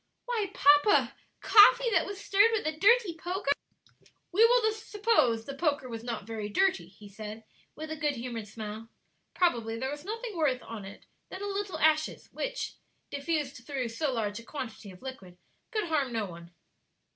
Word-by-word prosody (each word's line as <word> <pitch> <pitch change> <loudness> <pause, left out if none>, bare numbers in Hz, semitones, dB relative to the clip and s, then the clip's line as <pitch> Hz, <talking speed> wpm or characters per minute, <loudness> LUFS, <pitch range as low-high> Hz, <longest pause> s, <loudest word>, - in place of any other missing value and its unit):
"Why, 455 -5 -1
papa! 290 +8 +5 0.3
coffee 465 +3 +7
that - - +2
was 400 -1 -6
stirred 405 +2 +4
with 440 - 0
a 310 - +1
dirty 410 +2 +4
poker?" 355 -1 -2 0.8
"We 405 +6 +5
will 460 -1 +5
suppose 420 - +1
the 275 - -6
poker 285 -3 0
was 230 -2 -7
not 235 -4 -4
very 220 -2 -5
dirty," 380 - +1
he 210 - -15
said, 215 +2 -8 0.3
with 315 0 -7
a - - -2
good 295 -1 -1
humored 235 -3 -5
smile; 220 +1 -7 0.5
"probably 235 -11 +1
there 265 +3 -3
was 290 0 -7
nothing 445 +2 -5
worse 290 -6 +1
on 220 -4 -8
it 195 - -11 0.2
than 380 +2 -7
a - - -2
little 395 -3 -3
ashes, 310 0 +1
which, - - -4 0.4
diffused 285 -1 -2
through 255 -2 -3
so 275 +5 -1
large 215 -3 -2
a - - -11
quantity 225 -6 -7
of 185 +5 -14
liquid, 195 -10 -9 0.3
could 430 -1 -1
harm 295 -6 0
no 225 -2 -1
one." 170 -2 -10
290 Hz, 175 wpm, -29 LUFS, -, 0.8 s, coffee